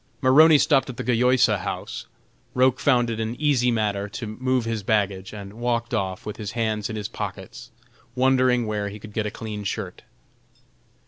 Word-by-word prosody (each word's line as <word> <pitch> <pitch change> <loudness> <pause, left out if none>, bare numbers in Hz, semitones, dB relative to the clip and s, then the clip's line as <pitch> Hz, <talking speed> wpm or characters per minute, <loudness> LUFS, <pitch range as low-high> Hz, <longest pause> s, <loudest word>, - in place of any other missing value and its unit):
Maroney 150 +4 +7
stopped 135 -2 +3
at 125 - -7
the 125 - -3
Gayosa 125 -2 +3
House. - - -5 0.5
Roch 130 0 +3
found 120 -4 +2
it 115 - -4
an 110 +1 -2
easy 140 -5 +2
matter 105 -3 -1
to 115 - -6
move 125 +3 -1
his 115 -2 -2
baggage, 100 -2 0
and 100 -1 -9
walked 120 +1 -2
off 95 -4 -2
with 105 - -6
his 110 -1 -6
hands 110 -3 -1
in 110 - -4
his 105 -1 -3
pockets, - - -7 0.5
wondering 130 -2 +3
where 105 -1 -2
he 100 - -8
could 105 0 -12
get 110 -1 -1
a - - -1
clean 105 -1 -6
shirt. 100 - -4
115 Hz, 180 wpm, -24 LUFS, 105-125 Hz, 0.5 s, Maroney